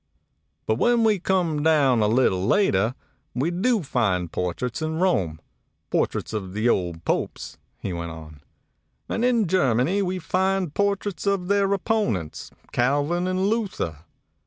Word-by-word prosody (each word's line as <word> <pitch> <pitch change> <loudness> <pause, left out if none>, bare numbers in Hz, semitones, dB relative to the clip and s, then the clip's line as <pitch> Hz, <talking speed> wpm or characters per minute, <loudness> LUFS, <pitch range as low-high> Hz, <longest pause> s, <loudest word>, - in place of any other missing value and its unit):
"But 110 +1 0
when 240 -1 +3
we 215 -3 +3
come 175 -5 0
down 145 -6 +3
a 105 - +3
little 105 -5 +2
later, 110 - +2 0.4
we 140 +7 0
do 210 +3 +1
find 100 - 0
portraits 90 - -3
in 155 0 -2
Rome, 95 - +1 0.5
portraits - - -1
of 95 -4 -4
the 110 +3 0
old 85 -7 0
Popes," - - -3 0.2
he 95 - -4
went 85 0 -4
on; 80 -2 -11 0.7
"and 225 - -2
in 240 -3 +3
Germany 160 - +2
we 185 -1 -1
find 185 -1 0
portraits 200 -1 -1
of 195 -2 0
their 200 -1 +2
opponents, 195 - -1 0.2
Calvin 145 +8 +1
and 185 +1 0
Luther. 200 - -1
155 Hz, 140 wpm, -24 LUFS, -, 0.7 s, when